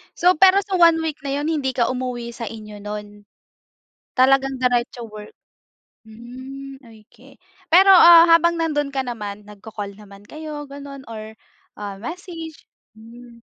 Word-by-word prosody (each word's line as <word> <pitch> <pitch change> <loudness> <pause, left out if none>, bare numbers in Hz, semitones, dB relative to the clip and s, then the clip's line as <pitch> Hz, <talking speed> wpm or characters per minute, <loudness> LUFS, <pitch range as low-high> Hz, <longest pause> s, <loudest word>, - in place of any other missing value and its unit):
So, 360 +1 +3
pero 380 +3 +6
sa 390 -1 -3
one-week 325 -4 +2
na 280 +1 -2
'yon 295 - -3
hindi 295 -5 -1
ka 245 -2 0
umuwi 250 -2 -4
sa 230 - -7
inyo 210 -2 -11
no'n? 210 0 -8 0.9
Talagang 270 +1 +3
diretso 245 -1 -1
work? 210 0 -11 0.7
Hmm. 260 +4 -11
Okey. 235 +2 -19 0.3
Pero 380 +4 +6
ah, 340 -2 +9
habang 335 +1 +4
nandoon 300 -3 -1
ka 265 - 0
naman 210 -4 -7
nagko-call 205 0 -9
naman 200 -1 -15
kayo, 305 +3 -8
ganon, 280 -1 -10
or 220 0 -9 0.4
ah, 200 -2 -7
message? 330 - -8 0.3
Hmm. 235 +1 -15
255 Hz, 135 wpm, -21 LUFS, 220-310 Hz, 0.9 s, ah